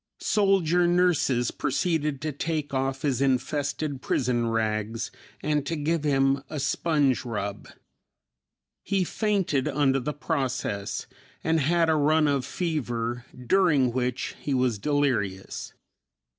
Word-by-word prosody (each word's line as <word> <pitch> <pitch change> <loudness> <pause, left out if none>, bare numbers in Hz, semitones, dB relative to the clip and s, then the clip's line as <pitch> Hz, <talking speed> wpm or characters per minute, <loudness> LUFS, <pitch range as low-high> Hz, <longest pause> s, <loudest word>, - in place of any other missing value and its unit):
Soldier 185 -4 +3
nurses 175 -9 +2
proceeded 150 -1 -1
to 155 0 -2
take 150 0 -3
off 135 0 -1
his 135 -3 0
infested 140 +1 0
prison 120 -3 0
rags 110 0 -1 0.3
and 150 -1 +1
to 165 - -1
give 155 +1 -1
him 135 -1 +2
a 150 - -4
sponge 145 -1 +1
rub. 105 -4 -4 1.1
He 195 -2 0
fainted 190 - 0
under 135 -2 +2
the 135 +4 -2
process 130 -10 -2 0.4
and 160 0 +2
had 165 +3 +2
a 160 - +4
run 155 +1 +3
of 140 -3 +1
fever 120 -8 -2 0.2
during 150 -8 +3
which 125 0 -2
he 140 - -1
was 125 -4 +1
delirious. 115 -9 -1
140 Hz, 120 wpm, -26 LUFS, 125-160 Hz, 1.1 s, a